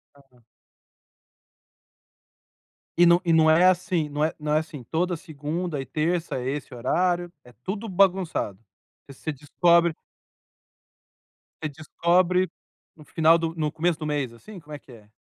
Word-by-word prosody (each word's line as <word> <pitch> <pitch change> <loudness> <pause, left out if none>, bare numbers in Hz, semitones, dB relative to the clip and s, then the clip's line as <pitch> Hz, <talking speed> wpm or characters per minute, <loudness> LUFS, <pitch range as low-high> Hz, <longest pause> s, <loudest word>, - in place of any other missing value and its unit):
Aham. 135 -4 -24 2.6
E 175 - +7
nã 170 0 +6
não 160 -1 +5
é 165 +3 +5
assim, 180 -4 +2
não 145 +1 -2
é 155 - +1
não 150 0 -2
é 155 - +4
assim, 155 -4 -8
toda 175 +8 -1
segunda 160 0 -4
e 135 - -4
terça 160 +4 -1
é 125 0 -3
esse 140 -1 -5
horário? 175 +8 0
É 125 - -17
tudo 205 - -4
bagunçado? 185 - +1 0.5
Você 140 +3 -6
descobre 170 +4 +2 1.7
você 155 - -1
descobre 175 +5 +1 0.5
no 150 - -16
final 165 +2 +4
do 165 -1 -3
no 155 -2 -1
começo 165 +1 0
do 155 - -5
mês, 145 -5 -2
assim, 190 - -12
como 150 -2 -12
é 145 - -6
que 135 - -18
é? 105 -3 -16
160 Hz, 145 wpm, -25 LUFS, 145-175 Hz, 2.6 s, E